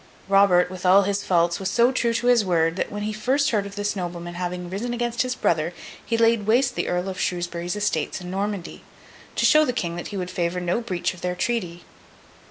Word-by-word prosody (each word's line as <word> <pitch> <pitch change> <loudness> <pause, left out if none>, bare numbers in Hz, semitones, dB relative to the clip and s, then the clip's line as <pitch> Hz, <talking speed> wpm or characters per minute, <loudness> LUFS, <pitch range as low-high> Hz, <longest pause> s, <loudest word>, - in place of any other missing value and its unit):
Robert, 195 -2 +4
with 185 -1 -8
all 190 +2 +6
his 200 +1 -1
faults, 170 -1 +2
was 190 -1 -2
so 240 +5 +3
true 240 -3 +1
to 230 +1 -2
his 245 -3 +5
word, 165 -3 +1
that - - -2
when 205 0 -4
he 215 +1 -2
first 260 +7 +1
heard 205 -3 0
of 200 - -10
this 205 0 -2
nobleman 175 -2 -5
having 180 0 -4
risen 220 +7 -3
against 240 0 -1
his 250 0 -1
brother, 165 -5 0 0.3
he 230 - -1
laid 230 -2 +3
waste 250 +4 +3
the - - -2
Earl 180 +1 -1
of 190 -1 -5
Shrewsbury's 175 0 -2
estates 205 -7 -1
in 180 -1 -7
Normandy, 195 -2 -4 0.5
to - - +1
show 305 0 +6
the 250 - 0
King 170 -7 -3
that 175 - -5
he 205 - -6
would 180 -1 -4
favour 175 0 -1
no 180 +6 -1
breach 185 -8 -2
of 180 - -14
their 180 0 -2
treaty. 180 -6 -2
190 Hz, 225 wpm, -24 LUFS, 175-230 Hz, 0.5 s, all